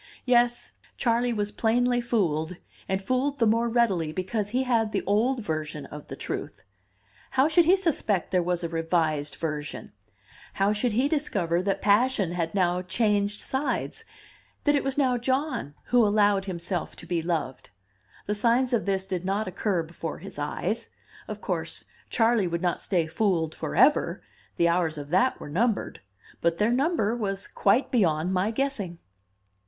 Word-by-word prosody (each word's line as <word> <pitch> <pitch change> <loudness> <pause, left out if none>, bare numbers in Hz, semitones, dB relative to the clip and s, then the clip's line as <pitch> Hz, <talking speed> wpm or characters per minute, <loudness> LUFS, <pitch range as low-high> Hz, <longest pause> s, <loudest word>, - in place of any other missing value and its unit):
Yes, 240 -1 +2 0.3
Charley 240 0 +1
was 210 -2 -1
plainly 245 +3 +1
fooled, 180 -8 0 0.3
and 190 0 +1
fooled 260 +5 0
the 235 - +3
more 230 +2 +2
readily 200 -10 +1
because 195 +5 -2
he 255 +4 0
had 230 -4 +1
the - - 0
old 235 +6 +1
version 155 -3 -4
of 150 0 -10
the - - -7
truth. - - -6 0.7
How 265 +2 +3
should 320 +2 +4
he 360 +4 +6
suspect 280 - 0
there 180 -1 +3
was 175 0 -1
a - - 0
revised 160 -3 0
version? 150 -2 -5 0.6
How 195 +2 +2
should 215 +2 0
he 250 +6 +2
discover 195 - 0
that 195 +1 -1
passion 205 -2 +3
had 170 0 -2
now 180 -1 +2
changed 205 +1 +1
sides, 270 +2 -2 0.6
that 290 -1 +3
it 285 - +1
was 270 0 -2
now 255 -4 +2
John 260 - -1
who 245 -1 +3
allowed 205 -2 +3
himself 180 -1 -3
to - - -10
be 175 -2 -1
loved? 160 -6 -3 0.6
The 210 - -1
signs 240 +4 +2
of 230 - +1
this 190 -1 0
did 185 -2 -3
not 195 +3 -1
occur 185 -1 -1
before 165 +1 -6
his - - -9
eyes. - - -2 0.4
Of - - -6
course, - - -3 0.2
Charley 225 -4 +2
would 170 +1 -3
not 175 -1 0
stay 175 -4 +1
fooled 165 -3 0
forever; - - +2 0.3
the 170 - +4
hours 170 -2 +1
of 145 -1 -7
that 190 +9 +2
were - - -8
numbered, 210 +9 -1 0.4
but 170 0 +1
their 210 +3 +2
number 255 -4 +1
was 195 -4 -3
quite 205 +7 +2
beyond 175 -6 +2
my 190 +3 +1
guessing! 225 -8 -2
205 Hz, 165 wpm, -26 LUFS, 175-240 Hz, 0.7 s, he